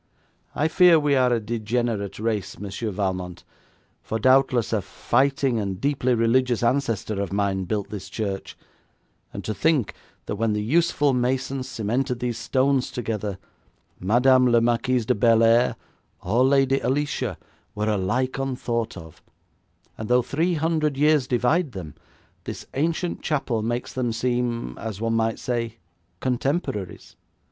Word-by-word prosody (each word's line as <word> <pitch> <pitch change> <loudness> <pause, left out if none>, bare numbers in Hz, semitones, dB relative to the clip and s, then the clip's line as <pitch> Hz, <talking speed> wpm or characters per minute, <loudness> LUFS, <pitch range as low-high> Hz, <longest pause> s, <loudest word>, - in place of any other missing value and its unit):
I 150 - +2
fear 170 0 +6
we 145 -1 +1
are 130 -2 +3
a 120 - +2
degenerate 110 -1 -2
race, 105 -2 -2
Monsieur 105 +3 -4
Valmont, 90 -3 -3 0.6
for 110 - -3
doubtless 130 -1 +3
a 110 - +1
fighting 135 +2 +1
and 95 -3 -3
deeply 135 -3 +1
religious 120 +1 +2
ancestor 115 -5 0
of 100 - -3
mine 100 -1 0
built 105 +1 -3
this 100 -2 -7
church, 100 -2 -4 0.7
and - - -7
to 110 - -2
think 145 - +1 0.3
that - - -4
when 110 0 +1
the 105 0 -1
useful 150 +2 +2
masons 130 +1 -1
cemented 125 +3 -1
those 120 -2 -2
stones 130 +2 +1
together, 105 -5 -3 0.6
Madame 125 +6 +4
la 120 -1 +5
Marquise 120 +1 +1
de - - +2
Bellairs 115 +2 +4 0.5
or 115 +8 +2
Lady 135 0 +3
Alicia 130 - -1 0.4
were 105 +1 -1
alike 110 +6 0
unthought 120 -5 -2
of, 80 -3 -12 0.8
and 110 - -5
though 125 0 +4
three 165 +7 0
hundred 155 -2 0
years 150 -2 +3
divide 130 +5 +1
them 85 -6 -7 0.5
this - - -6
ancient 165 +5 -1
chapel 135 -7 -1
makes 120 +2 -3
them 125 -2 -1
seem, 120 - -1
as 110 -3 -5
one 115 0 -1
might 115 0 +1
say, 115 -2 -3 0.4
contemporaries. 125 - -2
120 Hz, 140 wpm, -24 LUFS, 110-135 Hz, 0.8 s, fear